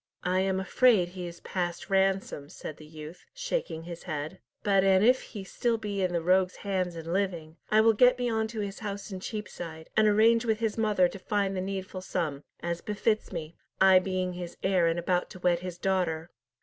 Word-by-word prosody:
"I 180 +1 +1
am 190 0 +1
afraid 195 -1 +4
he 180 -1 -6
is 170 0 -10
past 175 0 -3
ransom," 190 -6 +1
said 155 - -8
the 155 - -13
youth, 155 +2 -10
shaking - - -3
his 170 0 -8
head. 155 +2 -5 0.2
"But 195 -2 +4
an 190 0 +5
if 250 +3 +5
he 205 - -8
be - - -7
still 235 +4 0
in 200 -4 -2
the 170 -2 -1
rogues' 185 +1 +3
hands 185 -3 -1
and 165 +1 -5
living, 175 -5 -2
I 215 0 +5
will 225 0 +5
get 250 +4 +5
me 245 -1 -1
on 220 -1 0
to 220 -1 -4
his 200 -1 -5
house 205 -1 -5
in 190 - -5
Cheapside, 175 -6 -7
and 215 0 +5
arrange 225 +2 +5
with 220 -2 +1
his 225 -1 -1
mother 210 -5 +3
to 195 - -9
find 200 0 0
the 185 - -1
needful 190 0 -4
sum, 155 -6 -3 0.2
as 170 0 -2
befits 215 +1 0
me, 165 -3 -5 0.3
I 190 -1 +7
being 185 -1 -2
his 175 -1 -7
heir 185 -3 +3
and 165 0 +1
about 175 +1 0
to 185 - -11
wed 175 -1 +2
his 180 -1 -6
daughter. 175 -3 -1
185 Hz, 210 wpm, -29 LUFS, 175-205 Hz, 0.3 s, I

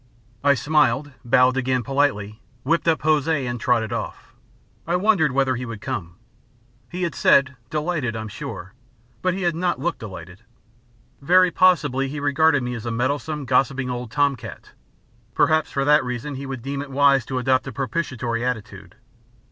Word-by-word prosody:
I 140 0 +5
smiled, 145 0 +1
bowed 125 +2 +3
again 130 -1 0
politely, 115 -6 -1 0.2
whipped 165 +5 0
up 160 -1 +2
Hosea 155 -3 +1
and 120 0 -3
trotted 115 -3 +1
off. - - -6 0.5
I 170 - +1
wondered 180 -6 +3
whether 130 -1 +1
he 125 - -5
would 115 -3 -6
come. 90 -4 -5 0.7
He 180 +1 -4
had 170 -3 -1
said: 135 -1 +3
"Delighted, 150 -6 -2
I'm 110 0 -5
sure," 100 -2 -8 0.5
but 185 0 0
he 190 - -4
had 175 -1 +1
not 175 +2 -1
looked 175 0 -2
delighted. 95 -4 -10 0.8
Very 180 +5 +4
possibly 145 -8 +3
he 145 +2 -5
regarded 145 0 +2
me 125 0 -3
as 115 -1 -6
a - - -1
meddlesome, 140 +5 -2
gossiping 130 +1 +1
old 125 -1 -5
tom 145 +2 +2
cat. 115 -4 -11 0.6
Perhaps 155 -1 +2
for 135 -1 -1
that 150 0 +5
reason 125 +3 -4
he 135 +1 -6
would 130 -3 -6
deem 140 +1 -3
it 145 - -8
wise 140 -1 +4
to 130 - -3
adopt 130 +1 +1
a - - -4
propitiatory 125 -3 -3
attitude. 125 -4 -5
135 Hz, 170 wpm, -22 LUFS, 120-150 Hz, 0.8 s, I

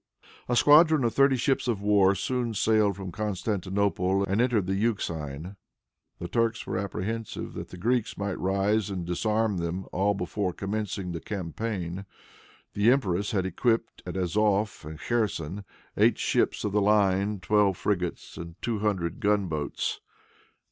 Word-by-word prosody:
A 125 - +2
squadron 150 +2 +6
of 115 - +1
thirty 135 -1 +4
ships 135 +1 0
of 115 -5 0
war 100 -2 +4
soon 120 +3 -2
sailed 105 -1 +3
from 95 -1 -6
Constantinople 100 -2 0
and 100 +4 +1
entered 120 -6 +2
the 95 - -1
Euxine. 90 -5 -2 0.6
The 85 - -5
Turks 115 +4 0
were 95 - -2
apprehensive 105 +3 -4
that - - -7
the 90 - -10
Greeks 120 +4 0
might 100 -1 -3
rise 100 +3 +1
and 90 -3 -4
disarmed 105 +3 0
them 85 +3 -3
all 100 +2 +1
before 95 0 -2
commencing 100 -2 -3
the 85 -2 -5
campaign. 95 -1 -4 0.7
The 105 +3 +3
empress 100 -7 +1
had 95 -3 0
equipped, 115 +5 0
at 90 - -5
Azof 105 +3 +1
and 80 0 -8
Kherson, 105 -4 -2 0.3
eight - - +4
ships - - +1
of 105 - -1
the 105 +1 +2
line, 100 0 +2
twelve 100 0 +2
frigates, 90 -4 -2
and 85 +1 -8
two 115 -3 -2
hundred 95 -6 -1
gun 105 -1 +2
boats. 75 -4 -3
100 Hz, 150 wpm, -27 LUFS, 90-110 Hz, 0.7 s, squadron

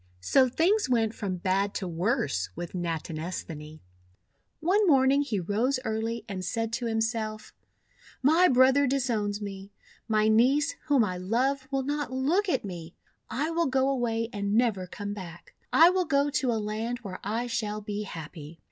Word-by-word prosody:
So 255 - +4
things 360 - +2
went 225 -3 +2
from 195 -5 -3
bad 195 +3 0
to 190 - -3
worse 170 - -1
with 175 - -6
Nat 170 -3 -2
inesthani. 155 -2 -6 0.8
One 390 +5 +2
morning 275 -2 +5
he 240 -9 -1
rose 225 +9 0
early 225 +1 -2
and 190 -3 -5
said 225 +2 -2
to 235 0 -2
himself: 220 -1 -2 0.3
— - - -27
'My 325 +6 +5
brother 265 +1 +5
disowns 220 -6 -1
me. 195 0 -7 0.4
My 215 -1 +2
niece, 255 +7 +3
whom 280 -5 +4
I 185 -4 -2
love, 260 +8 0
will 270 -1 0
not 290 0 -2
look 315 +10 +1
at 335 - 0
me. 175 -3 -8 0.3
I 305 +5 -1
will 335 0 +1
go 265 0 +2
away 230 -4 -1
and 200 0 -1
never 220 -6 +1
come 205 +2 -5
back. 175 -4 -10 0.2
I 330 +3 +7
will 370 -1 +1
go 285 -2 +2
to 260 -3 +1
a - - 0
land 220 +3 -3
where 190 -3 -6
I 225 +4 -1
shall 215 -3 -2
be 205 0 -4
happy." 160 -4 -8
225 Hz, 170 wpm, -28 LUFS, 195-270 Hz, 0.8 s, I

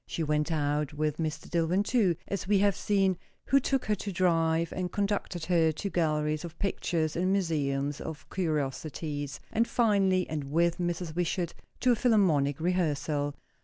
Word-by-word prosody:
She 165 - -2
went 150 +1 0
out 150 -1 0
with 150 0 -1
Mr. 155 -2 -3
Dillwyn, 175 +3 +1
too, 205 -6 +2
as 200 -2 -3
we 205 0 +4
have 200 -1 +3
seen, 195 -3 +1 0.3
who 275 - +4
took 270 0 0
her 215 - +1
to 205 0 -4
drive, 165 -2 +1
and 180 -1 -3
conducted 200 -4 -2
her 165 -2 +3
to 200 +6 -4
galleries 155 -2 0
of 170 -2 -8
pictures 165 -5 -1
and 185 +2 +1
museums 145 -7 0
of 155 -2 -7
curiosities; 150 -3 -2
and 230 +1 +2
finally, 195 -5 +2
and 150 -3 -3
with 170 +5 +1
Mrs. 175 -2 -2
Wishart, 175 0 -1 0.3
to 255 - +4
a - - +4
Philharmonic 175 - +3
rehearsal. 155 -4 0
170 Hz, 165 wpm, -29 LUFS, 150-190 Hz, 0.3 s, we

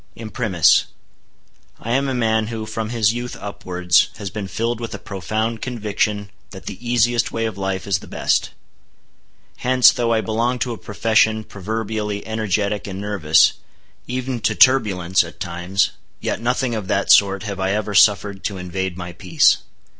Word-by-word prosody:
Imprimis: 110 - +2 0.9
I 115 - -5
am 135 +2 +1
a 130 - -1
man 110 -2 +1
who, 110 -1 -5
from 110 0 -4
his 115 -2 +2
youth 120 +1 -5
upwards, 90 -4 +1
has 100 -3 -6
been 105 -3 -5
filled 115 +3 -2
with 115 -1 -5
a - - -5
profound 110 +3 -3
conviction 105 -4 -2 0.2
that 95 - -11
the 100 - -7
easiest 120 0 +2
way 115 0 -2
of 110 -3 -3
life 95 -1 -3
is 100 -3 0
the - - -13
best. - - 0 1.1
Hence, 125 0 +5
though 120 -1 -1
I 110 -1 +2
belong 115 +3 -1
to 125 0 -2
a - - -7
profession 110 +1 +1
proverbially 105 0 -4
energetic 105 -2 -1
and 95 -1 -6
nervous, 80 -7 +3 0.5
even 125 0 -3
to 110 0 0
turbulence, 95 -10 +4
at 85 - -12
times, 90 +2 -1 0.3
yet - - -3
nothing 125 +1 0
of 105 -4 -4
that 100 +1 +1
sort 100 0 +5
have 100 -3 -5
I 95 0 0
ever 105 0 -2
suffered 100 -1 +3
to 100 -3 -2
invade 90 0 -4
my 90 -1 -6
peace. 85 -2 +3
105 Hz, 165 wpm, -20 LUFS, 95-115 Hz, 1.1 s, Hence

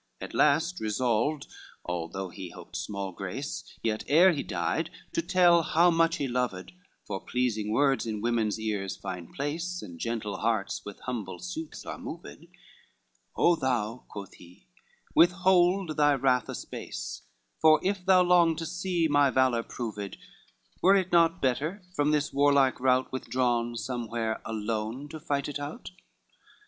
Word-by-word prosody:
XXV - - -5
At - - -14
last 160 +5 +3
resolved, 120 +6 0 0.4
although 90 +2 -4
he 90 +1 -8
hoped - - -12
small 100 -2 -4
grace, 100 - -5 0.2
Yet 110 -1 -1
ere 175 +6 +6
he 150 - -2
did 160 +1 -2 0.2
to - - +1
tell 175 -1 +5
how 170 +2 +4
much 165 0 +3
he 140 - -2
loved, 120 -7 -2 0.3
For 95 - -4
pleasing 110 -4 -1
words 135 +1 +2
in 110 -1 -3
women's 115 -1 0
ears 105 -3 -3
find 90 -3 -7
place, 165 +6 -3
And 85 -1 -10
gentle 110 -4 -3
hearts 110 -3 -1
with 100 - -9
humble 110 -7 -4
suits 170 -4 -7
are - - -6
moved: 170 0 -9 0.9
"O 175 - +5
thou," 125 -5 -2
quoth 100 -2 -9
he, 90 0 -17 0.5
"withhold 180 -1 +4
thy 145 -1 +4
wrath 130 -1 +1
a - - -4
space, - - -6 0.4
For 155 0 +6
if 195 0 -1
thou 185 -1 +5
long 175 -2 +4
to 165 +1 -4
see 180 -1 0
my 145 -2 +4
valor 130 -3 +2
proved, 105 -4 -6 0.6
Were 195 +2 +6
it 185 -2 +1
not 170 0 +3
better 150 +10 0
from 145 0 +2
this 150 -1 +1
warlike 140 -2 +3
rout 130 0 +2
Withdrawn, 120 -2 0
somewhere, 115 -1 -3
alone 110 +5 -3
to 155 - -7
fight 140 -2 -2
it 145 -1 -4
out? 145 +4 -7
135 Hz, 155 wpm, -28 LUFS, 110-165 Hz, 0.9 s, ere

